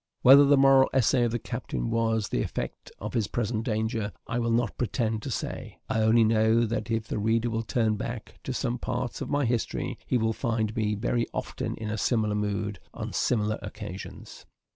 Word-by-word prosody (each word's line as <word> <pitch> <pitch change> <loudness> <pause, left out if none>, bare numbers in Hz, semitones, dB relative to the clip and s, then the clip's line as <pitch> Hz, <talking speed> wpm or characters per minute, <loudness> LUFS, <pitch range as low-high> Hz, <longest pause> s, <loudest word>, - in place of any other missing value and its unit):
Whether 140 +3 +9
the 140 0 +5
moral 135 0 +6
essay 125 -1 +4
of 115 - 0
the 120 - 0
captain - - -4
was 115 -2 +1
the - - 0
effect - - -5
of 105 +1 -6
his 115 -5 +1
present 110 0 -2
danger, 110 -1 -1
I 115 +1 -2
will 115 -1 0
not 115 +1 +1
pretend 115 -2 -1
to - - -5
say. - - -5
I 110 - +1
only 110 +1 +5
know, 110 +1 +3
that 115 +1 -3
if 115 -1 -1
the - - -2
reader 115 +2 +1
will 115 0 -1
turn 110 -2 0
back 115 +1 -6
to - - -2
some 120 -1 -2
parts 125 -1 -3
of - - -4
my 145 -1 +1
history, 120 -1 -2
he 125 - +2
will 110 -1 +1
find 110 -3 -1
me 105 -2 0
very 115 +2 0
often - - -3
in 110 -1 -5
a 110 - -2
similar 110 -3 +1
mood, 105 -1 -2 0.2
on - - -5
similar 110 -2 +1
occasions. 105 -2 -8
115 Hz, 200 wpm, -27 LUFS, 110-120 Hz, 0.2 s, Whether